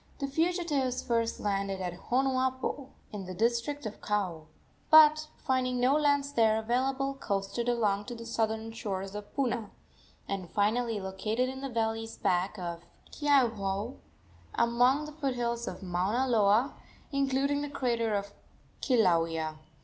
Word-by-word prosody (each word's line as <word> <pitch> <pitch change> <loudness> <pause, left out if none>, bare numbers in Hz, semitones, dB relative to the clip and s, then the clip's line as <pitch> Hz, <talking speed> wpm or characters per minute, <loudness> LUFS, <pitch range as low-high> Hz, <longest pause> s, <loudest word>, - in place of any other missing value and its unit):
The 280 - -2
fugitives 295 -4 0
first 230 -1 0
landed 195 -1 -1
at 180 -2 -3 0.2
Honuapo, 260 +1 0 0.2
in 200 -2 -5
the 185 - -6
district 235 +6 0
of 215 - -6
Kau, 180 -7 -2 0.4
but, 310 0 +7
finding 255 -2 0
no 255 +2 +4
lands 285 -1 +2
there 220 -3 +4
available, 265 +4 0
coasted 205 -1 -2
along 210 -4 +1
to 245 - -6
the 230 0 -9
southern 225 -1 -1
shores 195 -4 -4
of 210 0 -7
Puna, 240 -6 -1 0.6
and 190 -3 -4
finally 220 +3 +1
located 215 +6 -1
in 265 0 -7
the 275 - -4
valleys 225 -1 -2
back 185 +3 0
of 170 -2 -5 0.3
Keauhou, 230 -6 +1 0.6
among 245 +5 +3
the 300 - -8
foothills 245 -5 -2
of - - -6
Mauna 190 +8 0
Loa, 225 +2 +3 0.4
including 275 +1 +1
the 290 - -3
crater 235 -5 0
of 200 0 -3 0.5
Kilauea. 165 - +2
235 Hz, 135 wpm, -30 LUFS, 200-265 Hz, 0.6 s, but